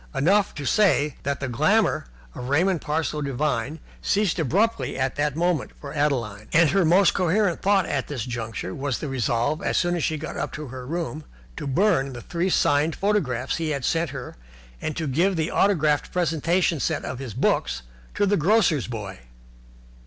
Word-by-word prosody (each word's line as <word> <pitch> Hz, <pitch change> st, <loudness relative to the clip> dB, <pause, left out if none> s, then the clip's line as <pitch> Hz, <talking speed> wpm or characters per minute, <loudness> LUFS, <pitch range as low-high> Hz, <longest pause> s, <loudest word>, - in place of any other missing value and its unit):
Enough 195 Hz, +6 st, +2 dB
to 145 Hz, -, -5 dB
say 150 Hz, -6 st, +3 dB
that 140 Hz, -1 st, -2 dB
the 140 Hz, -, -1 dB
glamour 155 Hz, -, +2 dB, 0.3 s
of 125 Hz, -, -6 dB
Raymond 170 Hz, +5 st, +2 dB, 0.4 s
Devine 140 Hz, +1 st, -1 dB, 0.2 s
ceased 200 Hz, -3 st, +1 dB
abruptly 165 Hz, -, +1 dB
in 130 Hz, 0 st, 0 dB
that 145 Hz, -1 st, -1 dB
moment 170 Hz, -3 st, 0 dB
for 140 Hz, -1 st, -8 dB
Adeline, 120 Hz, -9 st, -1 dB
and 165 Hz, -2 st, +5 dB
her 195 Hz, +1 st, +3 dB
most 175 Hz, +4 st, +5 dB
coherent 185 Hz, 0 st, +1 dB
thought 195 Hz, -2 st, +3 dB
at 140 Hz, -3 st, -2 dB
this 130 Hz, -6 st, -4 dB
juncture 115 Hz, -6 st, -4 dB
was 140 Hz, -2 st, -2 dB
the 155 Hz, -, -5 dB
resolve, 130 Hz, -, 0 dB
as -, -, 0 dB
soon 175 Hz, -1 st, +1 dB
as 170 Hz, -, -2 dB
she 155 Hz, -, 0 dB
got 155 Hz, +2 st, -6 dB
up -, -, -3 dB
to 150 Hz, -3 st, -6 dB
her 130 Hz, 0 st, -8 dB
room, 160 Hz, -1 st, -3 dB, 0.3 s
to -, -, -5 dB
burn 140 Hz, -3 st, +2 dB
the 120 Hz, -, -7 dB
three 175 Hz, +2 st, -1 dB
signed 150 Hz, -2 st, +2 dB
photographs 195 Hz, -, 0 dB
he 165 Hz, -2 st, -2 dB
had 140 Hz, -4 st, -2 dB
sent 165 Hz, -1 st, +1 dB
her 130 Hz, -2 st, -7 dB, 0.5 s
and 155 Hz, -, -3 dB
to 160 Hz, -, -2 dB
give 170 Hz, +8 st, +1 dB
the 160 Hz, 0 st, -1 dB
autographed 155 Hz, -7 st, +2 dB
presentation 170 Hz, 0 st, +1 dB
set -, -, -1 dB
of 130 Hz, -, -5 dB
his 130 Hz, -6 st, -6 dB
books -, -, 0 dB, 0.3 s
to 205 Hz, -, +2 dB
the 200 Hz, +1 st, +2 dB
grocer's 175 Hz, -, +3 dB
boy. 105 Hz, -5 st, -6 dB
155 Hz, 180 wpm, -24 LUFS, 135-175 Hz, 0.5 s, and